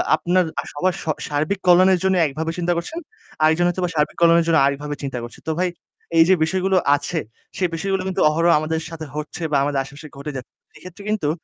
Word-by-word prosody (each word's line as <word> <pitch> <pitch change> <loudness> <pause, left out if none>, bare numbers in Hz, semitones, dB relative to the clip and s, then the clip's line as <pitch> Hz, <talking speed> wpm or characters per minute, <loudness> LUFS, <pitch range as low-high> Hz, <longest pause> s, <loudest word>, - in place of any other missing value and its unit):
আপনার 180 +3 +1 0.2
আর - - -3
সবার 180 +5 0
স - - -14 0.2
সার্বিক 155 +7 -1
কল্যাণের 185 +1 +6
জন্য 190 0 +2
একভাবে 155 +3 -3
চিন্তা 175 0 0
করছেন, 300 - -4 0.4
আরেকজন 160 +3 +4
হয়তোবা 180 0 -1
সার্বিক 150 -1 0
কল্যাণের 170 0 +5
জন্য 165 -1 +4
আরেকভাবে 145 +1 -2
চিন্তা 135 -3 -3
করছে। 120 -1 -10
তো - - +1
ভাই 180 0 +1 0.5
এই 165 - +9
যে - - +7
বিষয়গুলো 190 +3 +1 0.2
আছে 145 +4 -3 0.4
সে 185 - +1
বিষয়গুলো 195 +3 -1
কিন্তু 190 0 -1
অহরহ 165 +3 +2
আমাদের 160 +1 -2
সাথে 165 -2 -7
হচ্ছে 150 +3 -6
বা 145 - +3
আমাদের 140 -1 0
আশেপাশে 140 +3 -11
ঘটে 140 +2 -5
যাচ্ছে 130 -2 -8 0.2
সেইক্ষেত্রে 185 +3 -12
কিন্তু 210 -9 0
165 Hz, 200 wpm, -21 LUFS, 150-185 Hz, 0.5 s, এই